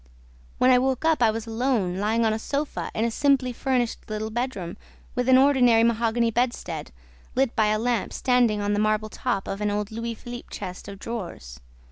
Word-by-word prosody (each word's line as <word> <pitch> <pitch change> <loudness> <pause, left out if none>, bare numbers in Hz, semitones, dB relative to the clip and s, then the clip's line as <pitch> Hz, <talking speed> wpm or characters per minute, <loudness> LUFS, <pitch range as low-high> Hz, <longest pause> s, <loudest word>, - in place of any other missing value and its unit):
"When 255 - +5
I 250 - +6
woke 265 +3 0
up, 320 -5 +3
I 230 - +5
was 225 +1 -3
alone, 225 -6 0
lying 220 +3 +1
on 220 - +2
a 220 - -2
sofa 285 +5 -3
in 220 - +1
a 235 - 0
simply 270 -1 +2
furnished 245 -3 -1
little 215 +1 -3
bedroom, 225 -7 -3 0.4
with 250 +1 -1
an 260 - +7
ordinary 255 -4 +5
mahogany 230 0 +2
bedstead, 245 +2 -2 0.4
lit 260 -1 +1
by 220 -2 +3
a 215 0 +2
lamp 235 +1 -1
standing 245 -5 +2
on 205 0 0
the 205 - +1
marble 215 0 +1
top 225 -4 -2
of 195 - -4
an 210 - +1
old 205 0 -2
Louis 230 +1 -4
Philippe 240 +2 -9
chest 180 +2 -7
of 200 -1 -8
drawers. 175 - -7
230 Hz, 195 wpm, -25 LUFS, 215-250 Hz, 0.4 s, an